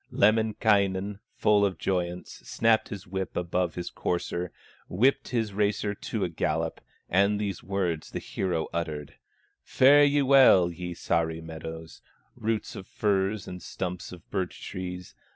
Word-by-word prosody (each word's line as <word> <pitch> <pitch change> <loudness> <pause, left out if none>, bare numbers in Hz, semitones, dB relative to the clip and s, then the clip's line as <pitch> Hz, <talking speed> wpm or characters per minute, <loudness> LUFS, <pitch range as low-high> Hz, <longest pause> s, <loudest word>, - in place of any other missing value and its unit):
Lemminkainen, 105 -2 +2 0.2
full 105 -1 +3
of 95 -4 +1
joyance, 90 0 -3
Snapped 115 -1 +2
his 100 -3 -7
whip 95 -2 -4
above 90 -1 -1
his 90 -1 -5
courser, 85 0 -2 0.4
Whipped 130 +9 +2
his 115 -4 -1
racer 105 0 0
to - - -4
a - - +1
gallop, - - -2 0.3
And 100 +3 +3
these 100 -4 -3
words 90 -5 -2
the - - -5
hero 85 -4 -2
uttered: 80 -4 -4 0.5
"Fare 145 +3 +6
ye 145 0 +4
well, 130 -10 +6
ye 90 0 -6
Sahri 80 -1 0
meadows, 80 0 -8 0.3
Roots 110 0 -2
of 95 - -8
firs, 100 0 0
and 90 0 -7
stumps 90 0 -5
of 90 -2 -12
birch 95 -2 -3
trees. 90 -1 -6
95 Hz, 140 wpm, -27 LUFS, 85-105 Hz, 0.5 s, Fare